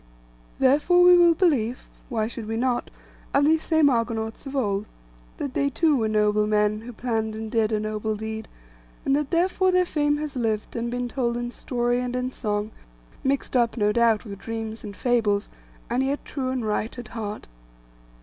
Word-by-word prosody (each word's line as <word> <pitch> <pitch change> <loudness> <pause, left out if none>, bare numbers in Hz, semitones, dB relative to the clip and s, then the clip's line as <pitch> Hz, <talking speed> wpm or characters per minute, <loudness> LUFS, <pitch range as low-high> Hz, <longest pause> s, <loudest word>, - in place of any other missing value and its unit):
Therefore 300 +7 +4
we 360 0 +8
will 345 -1 +6
believe—why 245 - -1
should 225 -1 -6
we 225 0 -2
not?—of 255 +3 -2
these 315 +1 +4
same 315 -2 +3
Argonauts 230 -1 -1
of 270 - -6
old, 205 -5 0 0.5
that 275 - -4
they 280 +1 +1
too 310 +2 +2
were 225 -4 +1
noble 210 0 +2
men, 210 0 +1
who 240 +2 -8
planned 220 -2 -2
and 220 0 -6
did 225 -1 +2
a 215 - +1
noble 215 0 -2
deed; 220 +1 -5 0.6
and 275 - +3
that 295 -1 -1
therefore 370 +2 +2
their 365 0 +3
fame 295 -3 +1
has 300 -1 -5
lived, 220 -4 -2
and 235 0 -2
been 245 0 -2
told 240 -1 -1
in 240 0 -3
story 245 -1 -1
and 250 0 -3
in 250 0 -2
song, 210 -3 -2 0.5
mixed 275 0 -1
up, 240 -1 +2
no 210 -1 +3
doubt, 230 0 +3
with 200 -2 -8
dreams 225 0 -5
and 205 -2 -7
fables, 220 -5 +1 0.4
and 245 +2 0
yet 275 +2 -1
true 260 -3 -3
and 255 -3 -2
right 215 +3 -2
at 240 -3 -8
heart. 215 -2 -5
235 Hz, 180 wpm, -25 LUFS, 220-275 Hz, 0.6 s, we